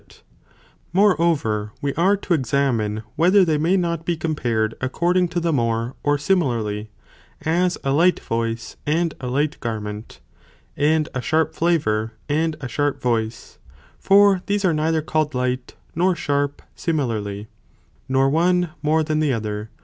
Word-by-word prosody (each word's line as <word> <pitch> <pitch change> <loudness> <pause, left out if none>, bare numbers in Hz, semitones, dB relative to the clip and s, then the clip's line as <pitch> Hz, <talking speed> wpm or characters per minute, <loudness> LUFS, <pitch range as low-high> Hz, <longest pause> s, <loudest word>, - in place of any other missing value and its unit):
Whether - - -22 0.7
Moreover, 160 - +2
(we 140 -2 -2
are 190 +5 +3
to 190 - -1
examine) 120 -7 0
whether 185 +4 +5
they 160 - +1
comparison - - -2
may 175 +5 +3
not 170 -2 -1
be 170 0 -1
compared 120 -9 -1
according 175 +7 +1
to 175 +1 -2
the 165 -1 0
more, 115 -4 +1
or 115 - -2
the 120 - -6
more, 145 0 0
or - - -1
similarly, 120 - 0 0.6
as 175 +3 +1
a 135 - 0
light 170 +6 +3
voice, 115 0 -3
and 165 +2 +1
a 125 - -4
light 145 +4 -1
garment, 105 -2 -5 0.6
ea 145 - 0
and 155 -1 -1
a 130 - -2
sharp 160 +6 +1
flavour, 110 -10 0
and 155 +2 0
a 130 - -4
sharp 145 +3 -1
voice, 115 -2 -2 0.4
for 200 -1 +5
these 205 -1 0
are 175 - +3
neither 155 +1 0
called 155 -2 -1
light 125 0 -2 0.2
nor 180 +2 +2
sharp 145 -2 -1
similarly, 110 - -2 0.6
nor 135 0 +3
one, 175 +4 +2
more 155 +2 +2
than 155 0 -1
the 155 -2 +2
other. 105 -2 -3
145 Hz, 165 wpm, -22 LUFS, 115-170 Hz, 0.7 s, whether